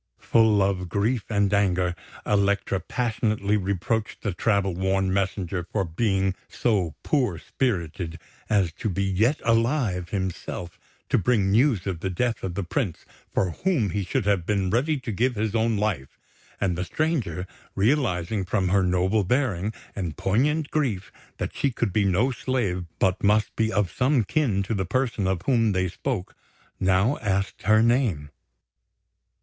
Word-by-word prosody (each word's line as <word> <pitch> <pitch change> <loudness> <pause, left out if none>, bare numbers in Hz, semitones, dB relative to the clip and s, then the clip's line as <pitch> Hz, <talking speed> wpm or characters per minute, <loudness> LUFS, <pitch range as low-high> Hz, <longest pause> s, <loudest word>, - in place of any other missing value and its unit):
Full 110 -3 +3
of 95 -2 -1
grief 105 +4 0
and 100 -2 +1
anger, 90 -3 +2 0.3
Elektra 100 -1 +1
passionately 110 -3 0
reproached 100 +3 -2
the 105 - -1
travel 100 -1 +1
worn 95 +1 0
messenger 95 -2 -1
for 100 - +1
being 95 +2 0 0.2
so 95 -10 0
poor 125 - +1
spirited 85 - -2 0.3
as 100 -6 +2
to 110 - -1
be 100 +1 -1
yet 105 +9 +2
alive 115 - +1
himself 95 -3 -4 0.3
to - - +3
bring 100 -2 +2
news 115 -3 +3
of 95 -4 -2
the 95 - -2
death 115 +6 -1
of 90 -2 -4
the 100 - -1
Prince, 90 - -2 0.3
for 90 - +1
whom 125 - 0
he 100 +3 -1
should 95 - -1
have 100 -4 +2
been 95 -1 0
ready 140 +7 +1
to 125 -2 -5
give 120 +5 +1
his 110 0 -1
own 115 -1 +1
life; 100 -11 -2 0.4
and 95 -4 0
the 90 - -2
stranger, 135 - -1 0.3
realising 105 - +1
from 95 0 0
her 95 +1 +3
noble 95 +3 +2
bearing 105 -3 0 0.2
and 85 -6 -4
poignant 145 +10 +1
grief 125 -12 -1 0.3
that - - -3
she 140 - +1
could 110 -6 -2
be 105 0 +2
no 100 +8 +2
slave 115 -9 -1
but 95 -1 +1
must 105 +1 +2
be 110 0 +1
of 100 -5 +1
some 130 -1 +2
kin 110 - +1
to 105 - -3
the 95 -3 0
person 115 -1 0
of 95 -2 -1
whom 115 -6 +2
they 95 0 +1
spoke, 100 +1 -4 0.4
now 95 +8 +2
asked 100 -2 -1
her 110 +2 +4
name. 115 - +1
100 Hz, 160 wpm, -25 LUFS, 95-115 Hz, 0.4 s, her